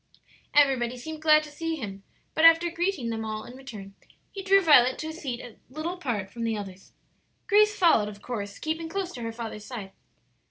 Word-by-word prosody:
Everybody 260 -4 +3
seemed 310 +5 -7
glad 310 -1 +5
to 300 - -10
see 325 +2 -3
him; 200 -9 -7 0.3
but 315 - 0
after 330 +1 +7
greeting 340 -8 -1
them 225 0 -3
all 215 0 -4
in 255 +4 -12
turn, 205 -7 -9 0.4
he 395 - -6
drew 390 +1 +5
Violet 260 -8 +5
to 315 - -5
a - - -6
seat 275 -8 -5
a 240 -3 -11
little 310 +6 -4
apart 230 - -4
from 235 +1 -6
the 225 -1 -1
others. 195 -2 -9 0.5
Grace 420 +1 +4
followed, 275 - +4
of 205 -1 -11
course, 205 -3 -5
keeping 320 +1 -3
close 385 0 -3
to 245 - -8
her 230 0 -3
father's 225 -2 -7
side. 210 -6 -7
260 Hz, 200 wpm, -27 LUFS, 225-325 Hz, 0.5 s, after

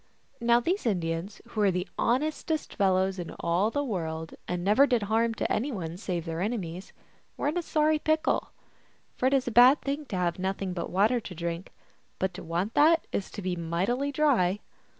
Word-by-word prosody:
Now 235 0 +4
these 345 - -1
Indians, 175 0 -2
who 220 - -5
were 205 -2 +4
the 180 0 -1
honestest 305 +5 -1
fellows 190 -1 +2
in 175 - -6
all 175 +5 +1
the 285 +5 -1
world, 160 - -4
and 180 -1 -2
never 215 +9 +5
did 245 -5 +1
harm 225 +2 +1
to - - -2
any 260 +7 0
one 170 -7 -4
save 175 -3 -3
their 165 0 -3
enemies, 185 -4 -3 0.5
were 290 - 0
in 305 - -3
a 355 - +1
sorry 310 -1 +2
pickle. 310 +1 +1 0.7
For 255 - +1
it 265 - +2
is 260 -2 +1
a - - 0
bad 250 +5 +7
thing 285 +2 -2
to 210 - -5
have 180 -1 -1
nothing 190 0 -2
but 170 -2 -4
water 215 +7 +3
to 195 -5 -9
drink, 170 +2 -4 0.5
but 190 0 -1
to 175 - -8
want 175 +6 -2
that 320 +3 +5
is 195 - -2
to 205 - -7
be 185 -1 -1
mightily 185 +12 -1
dry. 245 -11 +2
205 Hz, 195 wpm, -28 LUFS, 180-260 Hz, 0.7 s, bad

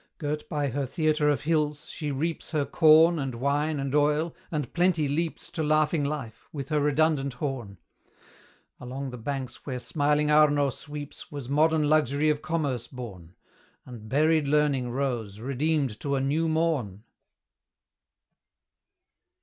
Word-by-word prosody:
Girt 150 0 -4
by 145 -2 -1
her 135 +2 -2
theatre 155 +1 +1
of 145 - +1
hills, 150 -1 0
she 150 - -5
reaps 155 +4 -3
Her 150 -3 0
corn, 160 +2 +5
and 135 -3 -3
wine, 145 +4 0
and 135 0 -3
oil, 150 +2 +2
and 150 -5 -3
Plenty 175 -4 +2
leaps 160 +3 -2
To 165 - -3
laughing 155 0 +2
life, 140 -6 -5
with 140 -2 -6
her 155 -1 +2
redundant 145 -1 +2
horn. 125 -6 -5 1.0
Along 130 +2 -5
the 125 - -8
banks 135 +1 -5
where 130 -3 -4
smiling 150 +2 +1
Arno 145 -2 +4
sweeps, 145 +2 -9
Was 140 -4 -6
modern 155 +1 +3
Luxury 150 0 +3
of 150 0 -2
Commerce 140 -8 -2
born, 95 - -9 0.5
And 115 -4 -10
buried 155 +3 +3
Learning 140 -4 +2
rose, 120 -6 -3
redeemed 140 -1 -1
to 140 -1 -1
a - - +1
new 145 +5 +1
morn. 155 - -1
145 Hz, 140 wpm, -27 LUFS, 130-155 Hz, 1.0 s, corn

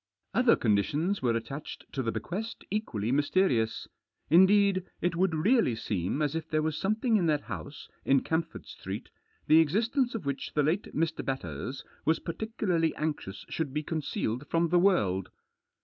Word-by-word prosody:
Other 250 -2 +5
conditions 145 - +1
were 120 -3 +2
attached 135 +6 -6
to 135 - -1
the 115 -3 -1
bequest 215 - -5
equally 120 - -1
mysterious. 140 - +1 0.4
Indeed, 190 +2 +5 0.2
it 175 -1 0
would 180 -1 +2
really 200 - +3
seem 105 - -2
as 145 -1 0
if 165 0 -4
there 155 0 +1
was 155 -1 -1
something 215 +6 +1
in 175 -4 +1
that 150 -2 +2
house 140 - -7 0.2
in 135 -1 +4
Camford 165 0 -2
Street - - -7 0.3
the 155 +1 +6
existence 230 - +1
of 200 -9 -4
which 140 -1 -3
the 150 - +3
late 165 +8 0
Mr. 160 +1 0
Batters 130 - -4 0.2
was 160 +1 +2
particu 220 +5 -5
larly 165 -3 +2
anxious 150 -11 -4
should 150 -4 -3
be 150 - 0
concealed 145 -5 -3
from 165 0 +2
the 175 +1 +4
world. 100 - +2
160 Hz, 165 wpm, -29 LUFS, 135-190 Hz, 0.4 s, the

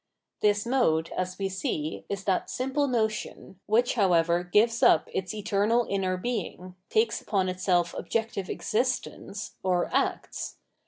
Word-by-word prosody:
This 205 0 +2
mode, 165 -11 +2
as 185 0 -2
we 195 - -1
see, 190 - -3
is 200 -1 -3
that 190 -2 0
simple 270 +3 0
notion, 220 -5 -2
which 235 +3 +3
however 175 -5 +3
gives 220 +6 +2
up - - +5
its 185 -1 -2
eternal 215 +3 +1
inner 190 -2 0
Being, 185 -4 -4 0.2
takes 445 +1 +2
upon 190 -3 0
itself 180 -1 +1
objective 220 -4 -2
existence, 220 -3 -2
or 180 -2 0
acts. - - -1
200 Hz, 130 wpm, -27 LUFS, 185-230 Hz, 0.2 s, up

